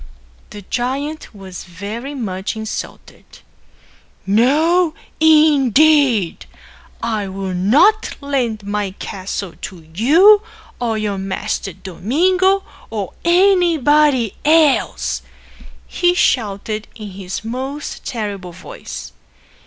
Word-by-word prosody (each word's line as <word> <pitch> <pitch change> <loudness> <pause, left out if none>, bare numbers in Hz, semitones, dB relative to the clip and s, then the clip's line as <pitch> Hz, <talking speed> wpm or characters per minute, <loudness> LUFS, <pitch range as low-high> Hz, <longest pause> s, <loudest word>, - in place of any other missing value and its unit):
The 205 -1 -10
giant 275 - -3
was 190 -3 -9
very 210 - -7
much 195 -5 -4
insulted. 220 0 -7 1.0
"No, 310 - +3 0.2
indeed, 295 - +4 0.6
I'll 195 -4 -3
not 295 - +3
lend 245 -7 -2
my 205 -2 -3
castle 190 -1 -5
to 170 -4 -9
you 340 - +6 0.4
or 230 -3 -1
your 205 -2 -2
master 195 0 -3
Domingo 365 - +1 0.3
or 205 -4 -4
anybody 315 - +3
else," 250 - +2 0.6
he 355 0 +1
shouted 215 - 0
in 210 -2 -8
his 190 +2 -6
most 265 +5 -5
terrible 200 -6 -5
voice. - - -9
230 Hz, 90 wpm, -18 LUFS, 195-305 Hz, 1.0 s, you